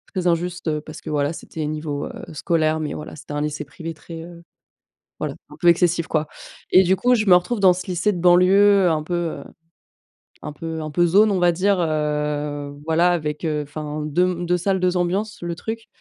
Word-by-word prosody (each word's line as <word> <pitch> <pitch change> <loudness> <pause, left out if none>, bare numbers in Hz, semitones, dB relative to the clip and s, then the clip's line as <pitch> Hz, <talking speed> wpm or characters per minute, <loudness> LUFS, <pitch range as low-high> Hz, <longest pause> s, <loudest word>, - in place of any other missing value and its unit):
très 185 -1 -1
injuste, 175 0 -1
heu, 150 -1 0
parce 155 0 -10
que - - -6
voilà 145 0 0
c'était 160 -1 -7
niveau, 150 -1 -3
heu, - - -9
scolaire, 155 +1 +1
mais 155 -2 -3
voilà, 150 - -8
c'était 145 -1 -9
un 145 - -2
lycée 150 0 -3
privé 160 +3 -7
très, 165 +1 -10
heu, 170 0 -12 0.8
voilà, - - -3 0.2
un - - -12
peu 175 - -2
excessif, 170 -1 +4
quoi 155 -1 -1 0.4
et 185 +1 +6
du 185 +2 +3
coup, 250 +5 +3
je 215 -1 -1
me 185 - +7
retrouve 190 +6 +1
dans 190 -2 +6
ce 180 +1 -5
lycée 185 +4 +1
de 175 - -4
banlieue, 185 +2 +5
un 155 -1 0
peu, 175 +3 -4
heu, 175 -2 -2 1.0
un - - -6
peu 160 +1 -5
un 155 - -5
peu 175 +3 +3
zone, 205 +5 +4
on 190 - +1
va 175 -1 +4
dire, 190 +2 +1
heu, 150 -2 -2
voilà 170 +2 +3
avec, 150 -1 -2
heu, 150 -1 -1
enfin 150 +1 -6
2 155 +4 +1
m 175 -1 -2
2 180 +1 +2
salles, 190 +2 0
2 180 0 +1
ambiances 195 +5 -1
le 175 0 -3
truc. 225 +5 -6
170 Hz, 215 wpm, -22 LUFS, 155-180 Hz, 1.0 s, me